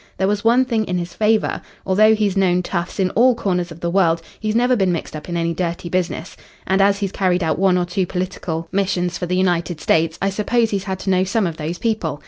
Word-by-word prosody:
There 190 - +1
was 205 0 -1
one 240 +3 +4
thing 230 -4 0
in 180 -2 -2
his 175 -1 -4
favour. 215 +2 +1 0.2
Although 215 +3 +4
he's 210 -3 0
known 180 -2 +2
toughs 175 +2 -4
in 185 -1 +1
all 245 +2 +4
corners 180 -5 -1
of 165 - -11
the 170 - -1
world, 170 -3 +3 0.2
he's 215 0 -2
never 245 +2 +3
been 190 -5 +1
mixed 165 -2 -4
up 155 +3 -8
in 170 - -2
any 170 0 0
dirty 170 0 -3
business. 180 -1 -2 0.3
And 190 +1 +2
as 200 0 +4
he's 200 -2 -2
carried 185 -2 +1
out 160 +1 0
one 190 -1 +3
or 180 - +1
two 180 +1 -1
political 180 -3 -4
missions 180 -3 -1
for 180 - -3
the 180 +1 0
United 175 -3 0
States, 160 +1 +1
I 195 +1 0
suppose 225 +3 +1
he's 200 -1 -2
had 190 -1 -3
to 195 - -1
know 185 0 +3
some 195 +2 0
of 165 -3 -3
these 160 +3 -4
people. 210 -10 -2
185 Hz, 245 wpm, -20 LUFS, 175-205 Hz, 0.3 s, one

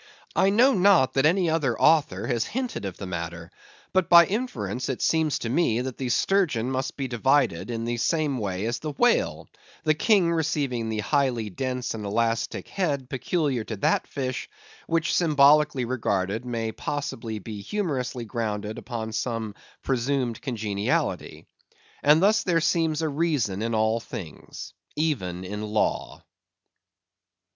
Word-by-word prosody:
I 195 - +4
know 245 +7 +5
not 185 -9 +4
that 135 +2 +4
any 180 +2 +2
other 150 -7 0
author 155 -1 +3
has 120 -3 0
hinted 250 - -4
of 95 -3 -5
the 100 - -6
matter; 85 -2 -6 0.4
but 185 -2 +2
by 170 -1 +9
inference 210 - -3
it 130 - -2
seems 160 -3 +1
to 115 - -4
me 120 -4 +2
that 130 -1 -5
the 130 -2 -2
sturgeon 135 - +1
must 130 0 -3
be 135 -2 -2
divided 120 -6 +1
in 115 -1 -3
the 120 0 -2
same 150 0 0
way 95 -1 -2
as 120 +1 -2
the 155 -2 -5
whale, 245 - +1 0.4
the 155 - +3
King 180 +1 +3
receiving 140 -8 -1
the 110 -1 -2
highly 120 -4 0
dense 125 +3 -3
and 110 -2 -6
elastic 115 +2 -1
head 145 -9 -2
peculiar 135 -2 -1
to 110 - -5
that 100 - +1
fish, 130 -2 -4 0.4
which, 165 0 +1
symbolically 150 -4 +4
regarded, 110 -3 -1
may 115 -2 -2
possibly 115 -3 -4
be 105 0 -7
humorously 130 - -3
grounded 105 -2 -3
upon 115 -2 -5
some 115 -2 -3 0.3
presumed 130 -2 -1
congeniality. 105 -6 -2 0.6
And 150 +4 +5
thus 210 +1 +4
there 175 -3 +2
seems 165 -1 +1
a - - +1
reason 140 - 0
in 115 0 -1
all 110 +1 +2
things, 85 -8 -9 0.2
even 95 - -1
in 105 +3 -5
law. 105 0 -1
130 Hz, 150 wpm, -25 LUFS, 110-155 Hz, 0.6 s, by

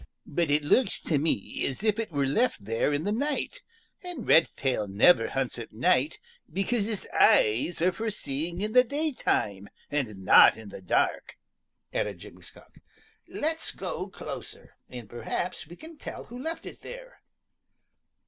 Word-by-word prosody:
"But 170 +1 -1
it 145 +1 +2
looks 195 - +2
to 150 -4 0
me 145 -10 -1
as 135 +9 -5
if 215 0 +2
it 225 -5 -3
were 140 -2 +1
left 140 - 0
there 115 +6 +1
in 145 +1 -1
the 205 - -1
night, 290 - -2 0.4
and 355 - -6
Redtail 130 -9 +3
never 115 - +5
hunts 135 -2 -2
at 115 - -8
night 130 +6 +2 0.3
because 200 +5 0
his 215 -2 -4
eyes 160 - +4
are 185 - +4
for 220 +4 -3
seeing 170 -1 -4
in 215 +1 -2
the 250 - +7
daytime 250 - -1 0.2
and 110 -10 -3
not - - +8
in 110 -2 -10
the 95 - -9
dark," 90 - 0 0.6
added - - -1
Jimmy - - -13
Skunk. - - -16 0.5
"Let's 320 +1 -2
go - - -5
closer, - - -9
and 120 -4 -8
perhaps 120 - -4
we 170 - -11
can 320 - -13
tell - - -7
who 245 +2 -10
left 325 +3 -5
it - - -10
there." - - -11
165 Hz, 160 wpm, -28 LUFS, -, 0.6 s, not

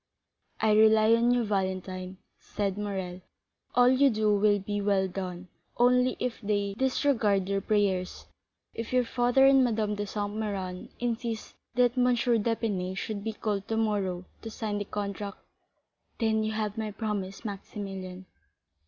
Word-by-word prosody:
"I 220 -1 +3
rely 220 +1 +6
on 230 +1 +3
you, 245 -1 +3
Valentine," 185 -2 -3 0.2
said 200 -2 -3
Morrel; 190 -3 -4 0.5
"all 245 0 +6
you 260 +2 +5
do 215 -2 +2
will 205 0 +4
be 205 +1 -3
well 200 -1 +2
done; 185 -1 -6 0.3
only 250 +1 +3
if 250 -2 -3
they 205 -1 -1
disregard 230 -6 +1
your 200 0 0
prayers, 195 -3 0 0.5
if 230 - -5
your 255 -1 +3
father 245 +3 +3
and 270 -1 +6
Madame 215 -3 0
de 205 0 -3
Saint 205 0 -3
Méran 195 -4 -4
insist 235 -2 -3 0.2
that 245 0 +3
M. 250 - +4
d'Épinay 225 -5 0
should 205 0 -4
be 220 0 -3
called 205 -2 -3
tomorrow 205 -5 -1 0.2
to 225 - -6
sign 215 -2 -3
the 205 - -3
contract——" 200 0 -4 0.8
"Then 220 -2 +1
you 215 0 -1
have 215 0 -2
my 215 -1 -2
promise, 205 -1 -4
Maximilian." 195 -2 -6
210 Hz, 145 wpm, -28 LUFS, 195-230 Hz, 0.8 s, rely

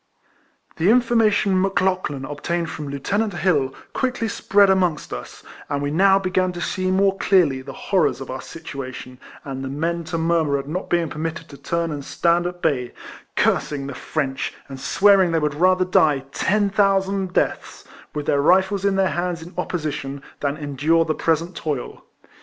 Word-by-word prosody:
The 170 +5 +2
information 225 -5 +3
Mc 195 0 0
Lauchlan 185 -8 -1
obtained 165 +4 -3
from 150 - -6
Lieutenant 200 +9 -1
Plill 150 -8 +1 0.2
quickly 250 -3 -1
spread 200 -1 +3
amongst 180 -5 0
us, - - -8 0.3
and 145 - -1
we 145 0 -2
now 190 +4 +5
began 185 -1 0
to 175 - -6
see 185 +2 -1
more 195 +1 +3
clearly 155 -9 +3
the 135 +1 -8
horrors 185 +3 0
of 135 - -7
our 130 - -5
situation, 130 -5 -8 0.2
and 135 -1 -5
the - - -4
men 165 +5 -2
to 165 0 -3
murmur 160 -3 +1
at 140 0 -6
not 180 +5 -4
being 170 -1 +1
permitted 160 +2 -5
to 140 - -11
turn 170 +4 -2
and 145 -2 -5
stand 170 +4 +1
at 175 0 -8
bay, 130 -6 0 0.2
— - - -22
cursing 140 -2 +1
the 140 - -5
French, 135 0 -3
and 135 -1 -8
swearing 190 +4 +4
they - - +3
would 150 -1 0
rather 185 +4 +3
die 150 -6 +3
ten 205 +6 +1
thousand 195 -2 +1
deaths, - - -1 0.3
with 150 -1 -3
their 140 - +2
rifles 190 +5 +3
in 200 -1 +2
their 190 -1 +2
hands 175 -1 -2
in 175 +3 -12
opposition, 145 -6 -4 0.2
than 140 0 -1
endure 150 +3 +1
the 155 - 0
present 165 +3 0
toil. 145 -5 -4
170 Hz, 175 wpm, -22 LUFS, 145-190 Hz, 0.3 s, now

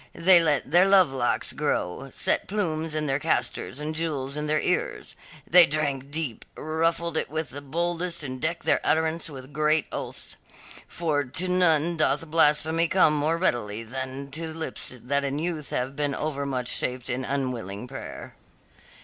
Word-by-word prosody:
They 175 0 +6
let 150 -4 +1
their 175 +3 +6
love 190 -7 +5
locks 120 -3 0
grow; 90 +10 -2
set - - 0
plumes 165 -6 -1
in 155 0 0
their 135 -1 0
castors 140 -3 0
and 150 +1 -3
jewels 150 -4 -2
in 150 0 -3
their 155 0 +2
ears; - - -2 0.3
they 175 0 +8
drank 140 -2 -1
deep, 145 -6 -3
ruffled 165 +1 -1
it - - -1
with 155 -3 -3
the 140 +2 -7
boldest 170 +3 -2
and 130 -2 -6
decked 165 +2 -2
their - - +3
utterance 160 +1 +1
with 135 -1 -10
great 155 +1 +2
oaths - - -5 0.5
for 155 -4 -1
to 160 +8 -1
none 170 -2 +2
doth 155 0 +1
blasphemy 160 +1 +3
come 175 -3 +4
more 150 +2 +1
readily 115 - -1
than 130 +3 -6
to 160 +3 -3
lips 160 0 -2
that 140 +3 0
in 140 0 -2
youth 160 -2 -3
have 130 +2 -2
been 145 -1 -1
overmuch 140 -4 -2
shaped 125 0 -2
in 130 +1 -2
unwilling 125 -6 -3
prayer. 135 +1 -8
150 Hz, 165 wpm, -26 LUFS, 135-165 Hz, 0.5 s, they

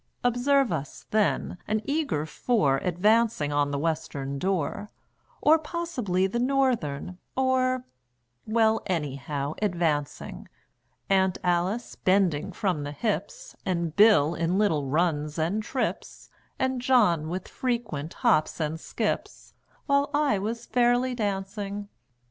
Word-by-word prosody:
Observe 245 +1 +3
us, 150 -3 -5
then, 210 -4 +1
an 215 +1 +1
eager 280 - -1
four 160 - +1
Advancing 185 -3 +2
on 145 0 +2
the 140 - -2
Western 140 -3 -2
Door, 190 +3 -1 0.5
Or 315 +2 +6
possibly 280 - -1
the 200 +5 -1
Northern, 240 - 0 0.2
or 255 -1 +1 0.6
Well, 220 0 +3
anyhow, 145 -3 -2
advancing; 170 -8 -1 0.6
Aunt 190 -1 +2
Alice 180 +6 0
bending 185 -2 +1
from 180 -4 -1
the 145 0 -5
hips, - - -3
And 170 -4 -1
Bill 200 -8 +6
in 170 +2 0
little 160 -9 +1
runs 150 0 0
and 170 +7 0
trips, 255 +4 -4 0.3
And 260 -1 0
John 210 -12 +3
with 185 +2 -4
frequent 230 - -3
hops 155 - +3
and 160 0 -2
skips, - - -3 0.3
While 280 0 +2
I 290 -9 +2
was 230 +4 -4
fairly 245 +1 +2
dancing. 205 -1 -3
195 Hz, 120 wpm, -27 LUFS, 160-240 Hz, 0.6 s, Or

